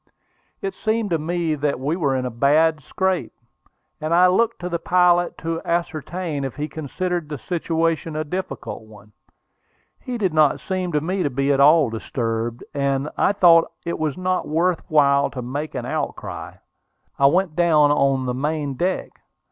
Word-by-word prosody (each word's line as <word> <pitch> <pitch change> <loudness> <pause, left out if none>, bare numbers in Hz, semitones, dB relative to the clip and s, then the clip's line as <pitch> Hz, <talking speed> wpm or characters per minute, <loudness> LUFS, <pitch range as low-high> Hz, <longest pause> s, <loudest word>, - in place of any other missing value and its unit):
It 390 -1 -2
seemed 220 -2 -1
to 165 - +1
me 165 0 -1
that 145 -2 -1
we 145 +5 -1
were 145 -7 0
in 130 -1 -1
a 125 - -3
bad 150 +6 +3
scrape, 190 +5 -2 0.7
and 155 +2 0
I 180 +1 +6
looked 230 +6 +2
to 175 - -3
the 170 -1 -2
pilot 175 0 +3
to 165 0 -3
ascertain 170 -2 -2
if 135 -3 -4
he 150 +2 -3
considered 165 +2 -3
the 150 - -4
situation 165 +2 -1
a 155 - -1
difficult 180 -2 -5
one. 110 -1 -16 0.9
He 250 -1 -5
did 190 -7 0
not 155 -2 +3
seem 185 -2 -3
to 150 - +1
me 185 +5 -2
to 145 - +1
be 140 +2 0
at 135 - 0
all 150 -2 +5
disturbed, 115 +1 -3
and 140 0 0
I - - +3
thought 170 -4 +5
it 170 - -3
was 155 0 -1
not 185 0 -1
worth 170 +3 +1
while 140 -2 +3
to 125 -2 -6
make 145 +5 -5
any 125 -1 -4
outcry. - - -4 0.6
I 140 - +6
went 175 +1 +1
down 155 -4 +4
on 135 -2 +2
the 125 - -1
main 145 +2 -2
deck. 180 +8 -2
155 Hz, 175 wpm, -22 LUFS, 140-175 Hz, 0.9 s, I